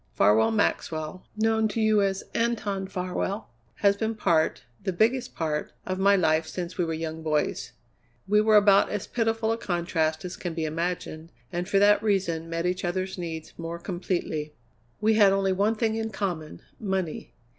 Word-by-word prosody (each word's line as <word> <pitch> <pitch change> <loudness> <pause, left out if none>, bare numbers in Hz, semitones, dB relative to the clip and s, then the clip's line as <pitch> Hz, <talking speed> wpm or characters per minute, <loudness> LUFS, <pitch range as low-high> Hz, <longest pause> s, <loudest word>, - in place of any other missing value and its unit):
"Farwell 105 +2 +4
Maxwell, 165 -5 -1
known 220 0 +2
to 215 - -3
you 215 -1 +4
as 195 -1 0
Anton 215 -5 -1
Farwell, 190 - -3 0.3
has 200 0 +6
been 220 +2 -2
part, 170 -7 +1 0.2
the 190 - 0
biggest 230 +8 +1
part, 155 -2 -2
of 185 0 -3
my 200 +1 +5
life 160 -3 +2
since 180 0 -5
we 180 - 0
were 165 -1 -2
young 160 0 -4
boys. 150 -6 -1 0.5
We 210 +2 +4
were 215 0 +4
about 200 -1 +6
as 210 -2 -3
pitiful 225 -1 0
a 225 - -1
contrast 170 -4 -1
as 180 - -6
can 175 -3 -5
be 160 -1 -1
imagined, 165 0 -3 0.2
and 175 +2 -2
for 200 - +3
that 205 +1 +5
reason 175 -6 0
met 165 +1 -2
each 180 +1 -1
other's 185 +1 -2
needs 160 -2 -6
more 165 0 -4
completely. 170 -4 -3 0.4
We 215 +1 +3
had 205 -3 +6
only 195 -1 +2
one 205 +4 +2
thing 220 0 0
in 225 0 -2
common 180 -7 -4 0.2
money. 190 -6 -3
185 Hz, 175 wpm, -26 LUFS, 165-210 Hz, 0.5 s, has